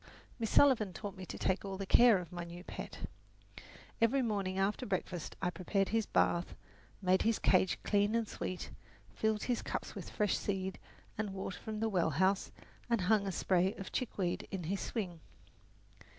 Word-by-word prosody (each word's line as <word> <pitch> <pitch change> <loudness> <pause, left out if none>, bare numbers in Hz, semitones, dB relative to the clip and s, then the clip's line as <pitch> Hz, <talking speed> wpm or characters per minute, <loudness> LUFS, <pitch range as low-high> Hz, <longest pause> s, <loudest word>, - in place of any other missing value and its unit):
Miss 225 -2 -1
Sullivan 230 -9 +5
taught 200 +1 -6
me 185 -1 -8
to - - -6
take 190 +1 0
all 195 -1 -4
the 195 - -4
care 235 +2 +7
of 175 -3 -6
my 175 -1 -4
new 170 +1 -9
pet. - - -7 1.0
Every 255 +4 +4
morning 200 -4 -1
after 195 +6 +1
breakfast 185 -5 -3
I 180 - +2
prepared 190 +3 0
his 225 -1 +1
bath, 175 +1 +1 0.5
made 185 0 +4
his 225 0 +2
cage 185 -1 +3
clean 205 +1 +2
and 230 -2 +1
sweet, 185 -2 -5 0.4
filled 220 -1 0
his 245 -2 0
cups - - -4
with - - -7
fresh 210 -3 +1
seed 190 -2 -2 0.4
and 205 -3 -2
water 190 -1 -4
from 215 -1 -5
the 225 - +2
well 180 -6 +2
house, 190 +6 +2 0.4
and 235 -4 +2
hung 200 +2 +3
a - - 0
spray 185 +1 +2
of 195 - -7
chickweed 195 -8 -2
in 190 -3 -4
his 190 +5 -2
swing. 185 -8 -3
195 Hz, 180 wpm, -34 LUFS, 185-215 Hz, 1.0 s, care